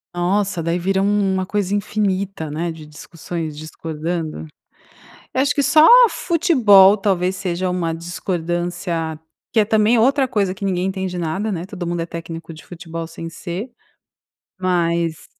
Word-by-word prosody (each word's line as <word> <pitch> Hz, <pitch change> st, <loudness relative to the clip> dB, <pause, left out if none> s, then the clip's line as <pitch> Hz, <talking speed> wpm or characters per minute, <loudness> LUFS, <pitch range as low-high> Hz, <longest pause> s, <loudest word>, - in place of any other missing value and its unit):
Nossa, 185 Hz, 0 st, 0 dB
daí 170 Hz, +2 st, 0 dB
vira 190 Hz, +2 st, 0 dB
um 200 Hz, -1 st, +1 dB
uma 190 Hz, 0 st, 0 dB
coisa 200 Hz, 0 st, -1 dB
infinita, 195 Hz, -5 st, -2 dB
né, 165 Hz, +3 st, -2 dB
de 160 Hz, -1 st, -10 dB
discussões 155 Hz, 0 st, -7 dB
discordando. 155 Hz, -, -5 dB, 0.9 s
Eu 260 Hz, -, +2 dB
acho 280 Hz, -, +1 dB
que 285 Hz, -, +2 dB
só 310 Hz, +3 st, +6 dB, 0.2 s
futebol 215 Hz, -, +5 dB
talvez 190 Hz, -2 st, 0 dB
seja 180 Hz, -1 st, -2 dB
uma 170 Hz, -2 st, -1 dB
discordância, 175 Hz, -1 st, -3 dB, 0.4 s
que 220 Hz, -, +5 dB
é -, -, +1 dB
também 220 Hz, +2 st, +3 dB
outra 270 Hz, +4 st, +3 dB
coisa 200 Hz, -6 st, 0 dB
que 195 Hz, +1 st, -6 dB
ninguém 185 Hz, -1 st, 0 dB
entende 190 Hz, -2 st, -3 dB
nada, 175 Hz, +6 st, -2 dB
né, 175 Hz, -3 st, -3 dB
todo 180 Hz, -2 st, -6 dB
mundo 175 Hz, 0 st, -2 dB
é 165 Hz, -, -2 dB
técnico 165 Hz, 0 st, -8 dB
de 155 Hz, -, -14 dB
futebol 165 Hz, -1 st, -7 dB
sem 165 Hz, 0 st, -8 dB
ser. 185 Hz, +8 st, -6 dB, 0.9 s
Mas 170 Hz, -3 st, 0 dB
180 Hz, 150 wpm, -20 LUFS, 165-200 Hz, 0.9 s, só